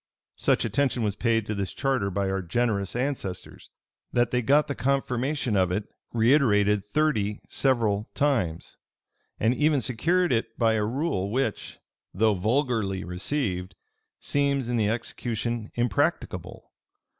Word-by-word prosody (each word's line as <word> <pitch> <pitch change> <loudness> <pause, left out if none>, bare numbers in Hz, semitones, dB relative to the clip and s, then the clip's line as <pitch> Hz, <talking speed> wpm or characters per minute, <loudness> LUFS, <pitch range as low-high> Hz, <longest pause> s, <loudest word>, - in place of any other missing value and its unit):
Such - - +2
attention 135 -4 0
was 105 -2 0
paid 115 -1 +1
to 105 - -3
this 100 -2 -3
charter 135 -8 0
by 100 +1 -1
our 95 0 -1
generous 100 +2 -1
ancestors, 125 -8 -4 0.4
that 120 -1 +2
they 125 - +1
got 145 +5 +4
the 145 - -3
confirmation 135 -2 0
of 95 -2 +2
it 105 +4 -1 0.3
reiterated 110 -5 +3
thirty 105 -3 0
several 115 -6 +1
times; 115 - 0 0.6
and 115 +3 +3
even 150 +1 +2
secured 165 +9 +1
it 115 - -2
by 115 -2 +3
a 110 -1 +1
rule 115 - -1
which, 130 +5 -2 0.4
though 110 +2 +3
vulgarly 110 -2 0
received, 90 - -2 0.4
seems 140 -3 0
in 120 0 0
the 105 -2 +2
execution 115 0 -3
impracticable. 120 -5 -1
115 Hz, 135 wpm, -26 LUFS, 100-135 Hz, 0.6 s, got